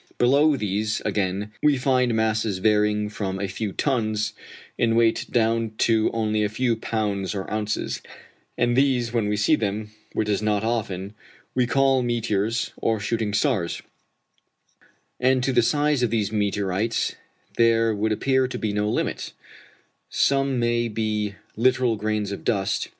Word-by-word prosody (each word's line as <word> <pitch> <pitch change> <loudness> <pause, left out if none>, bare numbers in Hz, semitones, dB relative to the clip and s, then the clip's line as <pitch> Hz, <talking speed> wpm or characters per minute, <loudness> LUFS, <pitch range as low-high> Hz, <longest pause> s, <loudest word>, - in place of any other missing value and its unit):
Below 140 +4 +4
these, 105 0 -1
again, 100 0 -1
we 150 -2 +4
find 125 -2 +2
masses 110 -2 0
varying 105 +1 +2
from 100 -2 -4
a 100 - -2
few 100 +2 -4
tons 110 -4 -1 0.4
in 115 -1 +1
weight 115 -1 +2
down 115 -1 +1
to 110 -1 +3
only 110 -1 0
a 105 - 0
few 120 +2 0
pounds 105 -3 -2
or 95 - -4
ounces, 105 0 -2 0.6
and 120 0 +2
these 125 -3 +2
when 115 -3 +1
we 105 - 0
see 110 +10 +3
them, 105 -2 -3 0.2
which 110 - -1
is 105 -1 0
not 105 -1 0
often, 105 -4 -2 0.4
we 125 -1 +1
call 135 0 +3
meteors 115 -2 -1
or 110 -1 0
shooting 110 0 -1
stars; 105 - 0 1.4
and 130 0 +2
to 135 - +1
the 120 - +5
size 145 +2 +1
of 120 - +2
these 110 -2 0
meteorites 105 +1 0 0.4
there 115 -1 +4
would 110 +1 -1
appear 130 +4 +2
to 125 - -5
be 105 -2 -2
no 105 +1 0
limit: - - -2 0.8
some 135 -1 +1
may 120 0 +1
be 105 -2 -2 0.2
literal 125 0 +2
grains 105 -1 -2
of 100 - -6
dust. 100 -4 0
110 Hz, 150 wpm, -24 LUFS, 105-120 Hz, 1.4 s, the